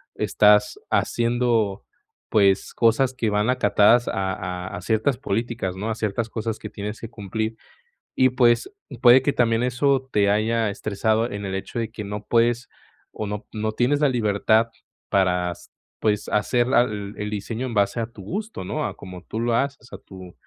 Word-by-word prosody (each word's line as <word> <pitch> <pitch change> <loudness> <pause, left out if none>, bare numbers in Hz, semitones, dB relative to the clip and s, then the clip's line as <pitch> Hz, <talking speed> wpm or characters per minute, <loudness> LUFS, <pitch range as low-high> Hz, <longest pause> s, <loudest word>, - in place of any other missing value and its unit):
estás 105 0 +3
haciendo, 115 -4 +1 0.5
pues, 100 -2 +2
cosas 125 +3 +3
que 115 -3 0
van 105 +3 +1
acatadas 120 -2 +4
a 95 -1 -1
a 90 -2 -5
a - - -7
ciertas 110 +6 +1
políticas, 115 -5 -3
¿no?, 105 +4 -4
a 110 - -1
ciertas 110 +1 -2
cosas 110 0 -4
que 105 - -7
tienes 105 +1 -6
que 115 - -7
cumplir. 110 0 -4 0.6
Y, 130 0 +4
pues, 125 - +2 0.3
puede 125 +1 +8
que 140 +2 0
también 115 -1 +2
eso 130 +2 +1
te 100 -1 +3
haya 110 +2 +1
estresado 110 +3 0
en 100 0 -5
el 95 0 -3
hecho 95 - -6
de 115 -1 -3
que 110 -2 -6
no 105 +1 -6
puedes 120 +1 +1 0.4
o 105 - -5
no 105 +2 -5
no 110 0 -2
tienes 135 +5 +1
la 150 - +4
libertad 110 -1 +2 0.4
para, 90 -2 +2
s 85 - -12 0.3
pues, 105 -1 0
hacer 120 +3 +1
la 130 -1 +5
el 105 -2 -5
diseño 110 +4 -4
en 120 - -5
base 100 +3 +1
a 115 - -2
tu 115 -4 -13
gusto, 210 - -5
¿no?, 150 +11 -3
a - - -4
como 90 -1 -10
tú 110 - -5
lo 120 0 0
haces, 140 -2 -2
a - - -7
tu 95 -2 -12
110 Hz, 180 wpm, -23 LUFS, 100-120 Hz, 0.6 s, puede